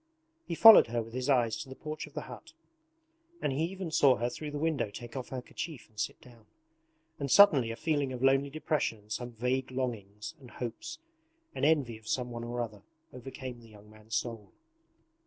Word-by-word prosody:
He 170 - -2
followed 225 - +10
her 115 0 -1
with 115 +1 -13
his 130 +2 -2
eyes 120 -5 +3
to 135 - -7
the 130 - -8
porch 155 +2 -6
of - - -18
the - - -2
hut, - - -11 0.9
and 135 - -1
he 155 +5 +1
even 185 -1 -5
saw 140 -4 +5
her 120 +1 -2
through 150 +4 -6
the 145 - -5
window 150 -7 0
take 120 +4 -9
off 130 -2 -5
her 130 -2 -5
kerchief 160 -4 -7
and 105 -1 -14
sit - - -2
down. 115 -3 -18 0.7
And 140 -1 -2
suddenly 145 - +7
a 115 - -3
feeling 145 -1 0
of 125 0 -5
lonely 135 +1 +4
depression 150 -5 -1
and 105 0 -21
some 120 +2 -4
vague 125 +3 -1
longings 110 -6 -4
and 130 -3 -13
hopes, 120 - -6 0.6
and - - -5
envy 140 -8 +2
of 110 - -19
someone 120 -2 -2
or 120 +1 -3
other, 105 -3 -8 0.3
overcame 125 -1 -8
the 115 - -16
young 105 0 -16
man's 110 +1 -7
soul. 115 -4 -3
125 Hz, 200 wpm, -31 LUFS, 115-145 Hz, 0.9 s, followed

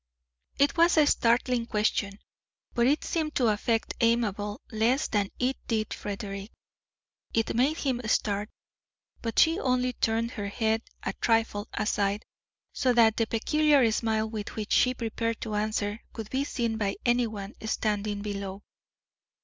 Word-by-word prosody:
It 285 +4 +2
was 335 0 +5
a 305 - +7
startling 235 -2 +2
question, 210 -2 0 0.6
but 235 0 +3
it 290 +3 +2
seemed 310 -2 -2
to 245 -4 +3
affect 225 +2 0
Amabel 210 -3 +1
less 235 +7 +2
than 205 -2 0
it 255 +2 0
did 220 -2 -1
Frederick. 200 0 -5 0.9
It 225 -1 +1
made 275 +7 +2
him 260 -5 -1
start, 210 -1 0 0.7
but 230 -2 -4
she 325 +3 +5
only 250 -1 +1
turned 230 +1 0
her 205 -5 -4
head 220 +2 0 0.2
a - - -2
trifle 225 -2 +1
aside, 205 -1 0 0.5
so 255 -3 +2
that 225 -2 +5
the 225 - +1
peculiar 280 +1 +3
smile 220 -1 0
with 215 -1 -6
which 215 -1 -5
she 255 0 +4
prepared 230 -1 -2
to 220 - -4
answer 210 0 -1
could 220 -2 -7
be 270 +2 0
seen 235 -5 -2
by 200 -2 0
anyone 225 -4 0
standing 210 -2 -1
below. 200 -1 -5
225 Hz, 145 wpm, -28 LUFS, 210-245 Hz, 0.9 s, a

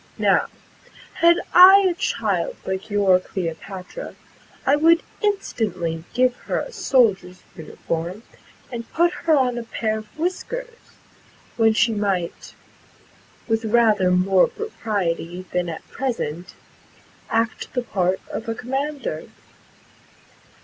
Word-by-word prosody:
Now, - - +3 0.7
had 340 +1 +4 0.2
I 385 +2 +9
a 360 - +1
child 435 +6 -1
like 190 +2 -4
your 200 -3 +4
Cleopatra, 185 - -6 0.5
I 275 - +4
would 330 +3 +4 0.2
instantly 205 - -2
give 250 0 +3
her - - 0
a - - -6
soldier's 195 - +1
uniform, 170 +3 -5 0.5
and 235 -2 -7
put 345 +2 +3
her 320 -2 +1
on 250 -3 +1
a - - -5
pair 220 -1 -2
of 215 - -12
whiskers, 470 +8 -4 0.8
when 225 -1 +4
she 225 +1 +2
might, 195 -5 -2 0.9
with 225 0 0
rather 215 -4 +3
more 185 +1 +4
propriety 185 - -3
than 180 -1 0
at 160 - -8
present, 185 - -4 0.7
act 225 0 -1
the 250 - -1
part 185 -4 0
of 225 +1 -5
a 225 - -2
commander." 275 +4 -4
225 Hz, 115 wpm, -22 LUFS, 185-285 Hz, 0.9 s, I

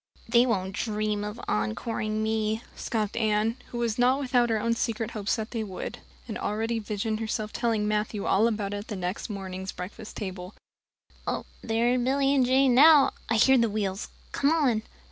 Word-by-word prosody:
"They 240 +1 +5
won't 190 -5 -1
dream 210 -1 -1
of 210 +3 -5
encoring 215 - -1
me," 220 0 0
scoffed 215 -3 -2
Anne, 220 +1 +1
who 240 - -7
was 235 -1 -1
not 255 +3 +4
without 250 -3 +2
her 220 -1 +1
own 230 +2 +1
secret 230 -1 -2
hopes 210 -2 -1
that 220 -1 -5
they 230 -3 -2
would, 190 -3 -6 0.3
and 220 - -5
already 225 +2 -1
visioned 215 0 -2
herself 215 -1 -3
telling 225 -3 0
Matthew 210 -1 -1
all 215 +4 +4
about 210 -3 -2
it - - -2
at 205 - -7
the 210 - -4
next 185 +4 -4
morning's 190 -2 -5
breakfast 195 +4 -8
table. 185 -1 -6 1.1
"There 230 +2 +1
are 255 - +2
Billy 270 +2 +2
and 270 -2 +4
Jane 260 +1 +4
now 290 +2 +7 0.2
I 225 - +2
hear 265 +4 +5
the 230 -1 +3
wheels. 200 -1 -2 0.2
Come 280 - +2
on." 280 -9 +2
220 Hz, 185 wpm, -27 LUFS, 210-235 Hz, 1.1 s, now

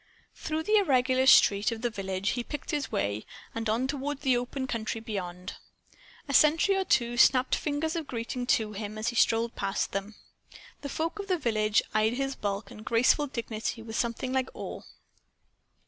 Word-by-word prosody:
Through 315 0 -3
the 425 +5 +3
irregular 260 -7 +3
street 205 -4 +6
of 230 0 -6
the 240 - 0
village 195 -1 -2
he 245 +1 -1
picked 295 +4 -6
his 295 -2 -2
way, 100 +2 -1 0.3
and 225 -1 -3
on 230 +4 +1
toward 285 0 -3
the 265 -3 +3
open 245 +2 -3
country 225 -2 -3
beyond. 185 -4 -6 0.7
A 280 - -3
sentry 320 +7 +5
or 385 - +1
two 240 -5 +1
snapped 255 +1 +5
fingers 305 +2 -1
of 325 -3 -3
greeting 245 +1 -4
to 220 -3 +2
him 210 +1 -6
as 215 - -1
he - - -6
strolled 230 0 +2
past 195 - -2
them. 200 +2 -4 0.7
The 280 - -5
folk 330 +8 -3
of 400 - -5
the 370 -2 +1
village 215 -6 +1
eyed 215 +1 +2
his 270 +1 -2
bulk 200 0 -4
and 215 - -11
graceful 245 +6 +3
dignity 230 -3 -4
with 225 -1 -7
something 240 +2 -2
like 260 -1 0
awe. - - -6
235 Hz, 180 wpm, -28 LUFS, 215-275 Hz, 0.7 s, street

